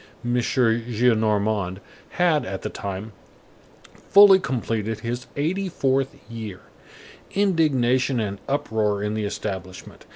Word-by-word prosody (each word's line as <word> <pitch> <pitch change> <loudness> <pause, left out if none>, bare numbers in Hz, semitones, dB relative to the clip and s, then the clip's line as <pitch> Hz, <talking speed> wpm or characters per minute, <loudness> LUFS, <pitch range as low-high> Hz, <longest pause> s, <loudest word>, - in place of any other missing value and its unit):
M. 120 - 0
Gillenormand 110 -5 +1 0.4
had, 170 -4 +3
at 95 0 -6
that - - -5
time, 100 +2 -5 0.8
fully 200 -1 +6
completed 115 - -2
his 120 +2 -4
eighty 185 +7 -1
fourth 135 -4 0
year. 110 -5 -7 0.7
Indignation 135 -10 +2
and 100 -2 -3
uproar 110 -7 0
in 105 0 -1
the 110 -1 -2
establishment. 95 -3 -6
115 Hz, 105 wpm, -23 LUFS, 105-135 Hz, 0.8 s, fully